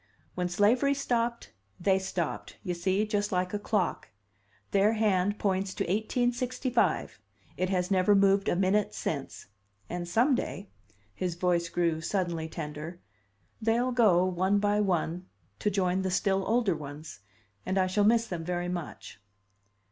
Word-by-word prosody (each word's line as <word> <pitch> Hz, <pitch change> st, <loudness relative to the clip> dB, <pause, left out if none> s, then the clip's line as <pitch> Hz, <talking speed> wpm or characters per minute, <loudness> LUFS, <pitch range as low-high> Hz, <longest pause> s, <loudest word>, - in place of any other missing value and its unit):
When 180 Hz, -1 st, -2 dB
slavery 235 Hz, +10 st, +3 dB
stopped, 235 Hz, -3 st, -1 dB, 0.3 s
they 190 Hz, +1 st, +3 dB
stopped, 185 Hz, -4 st, -4 dB
you 180 Hz, -4 st, -2 dB
see, 190 Hz, +4 st, 0 dB
just 205 Hz, -1 st, -1 dB
like 180 Hz, 0 st, -1 dB
a 205 Hz, -, -1 dB
clock. 205 Hz, -2 st, -1 dB, 0.6 s
Their 200 Hz, +2 st, +4 dB
hand 205 Hz, -2 st, +1 dB
points 190 Hz, -2 st, -1 dB
to -, -, -1 dB
1865 245 Hz, +5 st, 0 dB, 0.3 s
it 185 Hz, 0 st, -1 dB
has 180 Hz, 0 st, 0 dB
never 190 Hz, +2 st, +4 dB
moved 195 Hz, 0 st, +3 dB
a -, -, +1 dB
minute 195 Hz, +3 st, +1 dB
since. 140 Hz, -3 st, -4 dB, 0.5 s
And 175 Hz, 0 st, -4 dB
some 240 Hz, +10 st, +3 dB
day" 200 Hz, -5 st, -3 dB, 0.4 s
his 180 Hz, -, -3 dB
voice 175 Hz, -1 st, +1 dB
grew 170 Hz, -2 st, 0 dB
suddenly 170 Hz, -3 st, -2 dB
tender 155 Hz, +2 st, -6 dB, 0.6 s
"they'll 235 Hz, +3 st, +1 dB
go, 205 Hz, -8 st, +4 dB
one 185 Hz, +2 st, +1 dB
by 205 Hz, 0 st, +2 dB
one, 180 Hz, -2 st, -1 dB, 0.3 s
to 210 Hz, -, +1 dB
join 190 Hz, -2 st, +1 dB
the 190 Hz, -, -1 dB
still 190 Hz, +1 st, +1 dB
older 225 Hz, -4 st, +2 dB
ones. 150 Hz, -2 st, -9 dB, 0.4 s
And 190 Hz, +1 st, -2 dB
I 190 Hz, -, +4 dB
shall 190 Hz, +3 st, +1 dB
miss 230 Hz, +2 st, +4 dB
them 175 Hz, -6 st, -5 dB
very 175 Hz, +1 st, -2 dB
much." 175 Hz, -, -6 dB
190 Hz, 150 wpm, -29 LUFS, 175-210 Hz, 0.6 s, Their